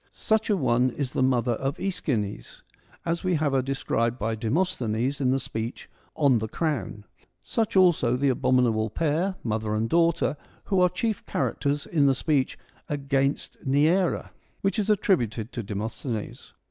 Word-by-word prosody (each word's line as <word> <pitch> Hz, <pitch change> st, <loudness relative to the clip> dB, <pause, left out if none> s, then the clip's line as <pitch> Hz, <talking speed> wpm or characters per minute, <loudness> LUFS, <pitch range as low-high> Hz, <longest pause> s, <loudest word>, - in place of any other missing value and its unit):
Such 220 Hz, 0 st, 0 dB
an 205 Hz, -3 st, +2 dB
one 125 Hz, 0 st, +3 dB
is 130 Hz, 0 st, -3 dB
the -, -, 0 dB
mother 125 Hz, -2 st, +2 dB
of 135 Hz, +4 st, -2 dB
iEschines, 135 Hz, -, -3 dB, 0.4 s
as 170 Hz, 0 st, -1 dB
we 185 Hz, -2 st, +1 dB
have 150 Hz, -2 st, +1 dB
her 135 Hz, -, +3 dB
described 125 Hz, -3 st, -1 dB
by 110 Hz, 0 st, -1 dB
Demosthenes 125 Hz, -, -1 dB
in 130 Hz, -, +2 dB
the 135 Hz, +1 st, +2 dB
speech 115 Hz, -1 st, -5 dB
' -, -, -35 dB
On 130 Hz, -4 st, +5 dB
the 110 Hz, -, -3 dB
Crown 135 Hz, -6 st, -2 dB, 0.2 s
'; -, -, -38 dB, 0.2 s
such 225 Hz, -1 st, +1 dB
also 170 Hz, -10 st, +4 dB
the 140 Hz, +1 st, +2 dB
abominable 125 Hz, -4 st, +2 dB
pair, 165 Hz, -, 0 dB
mother 110 Hz, -1 st, -1 dB
and 110 Hz, +1 st, 0 dB
daughter, 165 Hz, 0 st, +2 dB, 0.3 s
who 195 Hz, -2 st, +1 dB
are 180 Hz, -, +6 dB
the 180 Hz, -, -25 dB
chief 220 Hz, 0 st, -1 dB
characters 140 Hz, +3 st, -1 dB
in 145 Hz, -4 st, +2 dB
the 135 Hz, -, +4 dB
speech 140 Hz, -1 st, 0 dB, 0.2 s
' -, -, -32 dB
Against 135 Hz, 0 st, -1 dB
Neaera,' 155 Hz, +7 st, +2 dB, 0.3 s
which 200 Hz, +3 st, 0 dB
is 210 Hz, 0 st, -1 dB
attributed 120 Hz, -, +1 dB
to 120 Hz, -, -4 dB
Demosthenes. 110 Hz, +2 st, -5 dB
135 Hz, 170 wpm, -26 LUFS, 115-170 Hz, 0.4 s, are